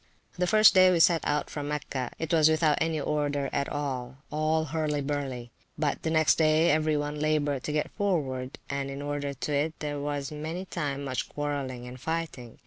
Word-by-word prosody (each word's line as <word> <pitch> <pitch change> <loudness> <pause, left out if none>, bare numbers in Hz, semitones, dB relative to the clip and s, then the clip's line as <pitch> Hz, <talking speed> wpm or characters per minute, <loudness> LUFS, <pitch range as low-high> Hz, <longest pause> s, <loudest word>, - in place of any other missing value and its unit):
The 180 0 0
first 215 +1 +7
day 185 -1 +7
we 175 - +2
set 165 -1 +5
out 150 0 0
from 145 -1 -5
Mecca, 140 -4 -3
it 160 0 -3
was 160 -1 +6
without 155 -2 +3
any 160 -1 +1
order 145 -2 -1
at 140 - 0
all, 135 -3 -4
all 155 +1 +1
hurly 150 -1 -1
burly; 135 -4 -3 0.3
but 150 -2 -1
the 160 - -1
next 160 0 +3
day 155 +1 +4
every 155 0 +2
one 145 0 -3
laboured 150 -3 0
to - - -2
get 150 0 -1
forward; 135 -10 -1
and 140 0 -3
in 140 +1 -6
order 145 -1 -3
to 145 +3 -3
it, 155 +3 0
there 145 -1 -4
was 145 -1 -3
many 160 +5 -5
time 145 -6 -3
much 130 -2 -3
quarrelling 140 -4 -3
and 125 +1 -9
fighting. 160 -6 -4
150 Hz, 195 wpm, -28 LUFS, 140-155 Hz, 0.3 s, first